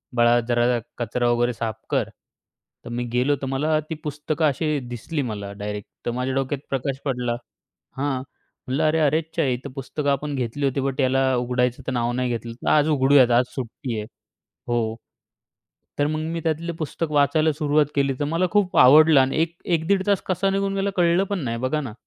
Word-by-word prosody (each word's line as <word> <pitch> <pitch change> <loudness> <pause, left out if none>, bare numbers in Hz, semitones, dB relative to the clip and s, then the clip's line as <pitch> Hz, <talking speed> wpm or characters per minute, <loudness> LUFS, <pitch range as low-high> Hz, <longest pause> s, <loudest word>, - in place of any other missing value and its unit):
"बाळा, 120 0 +5
जरा 120 0 +2 0.2
कचरा 120 +1 0
वगैरे 120 0 +1
साफ 110 -1 -3
कर." - - 0 0.8
तर - - -7
मी 120 +1 -2
गेलो, 130 +4 +2
तर - - -2
मला 150 +4 +1
ती 160 - -3
पुस्तकं 150 +2 -2
अशी 150 +1 +1
दिसली 140 +6 -3
मला 105 -5 -5
डायरेक्ट, 105 0 -6 0.2
तर - - 0
माझ्या 125 +2 -2
डोक्यात 135 +1 -1
प्रकाश 135 0 -2
पडला 125 -3 -1 0.6
हां. 135 -1 -1 0.5
म्हटलं, 135 +5 0
"अरे! 160 +1 +2
अरेच्चा! 155 +2 +1
ही 125 -3 +1
तर - - -4
पुस्तकं 140 +1 -3
आपण 145 +1 -2
घेतली 130 +2 -2
होती, 135 +1 0
बट, 135 +1 -1
याला 130 0 +2
उघडायचं 125 0 0
तर - - 0
नाव 120 -1 0
नाही 125 0 -1
घेतलं. 115 -1 -4
तर 115 - -4
आज 150 0 +4
उघडूयात, 135 -3 +5
आज 125 - +1
सुट्टी 125 -1 -5
आहे." 105 - -5 0.6
हो. 115 -2 0 1.0
तर 145 - +3
मग 155 +1 -1
मी 170 - -2
त्यातले 165 +1 -1
पुस्तक 155 0 -3
वाचायला 155 +2 +3
सुरुवात 150 0 +2
केली. 140 -1 +2
तर 145 - 0
मला 175 +2 +2
खूप 205 -3 +1
आवडलं 150 +3 +8
आणि 135 +3 0
एक 165 +1 -1
एक-दीड 180 +3 +1
तास 200 -1 +2
कसा 195 +1 +1
निघून 195 0 0
गेला, 195 0 0
कळलं 175 +1 +3
पण 200 -2 -1
नाही. 115 -1 -2
बघा 130 +5 -1
ना. 120 -6 -6
135 Hz, 190 wpm, -23 LUFS, 125-155 Hz, 1.0 s, आवडलं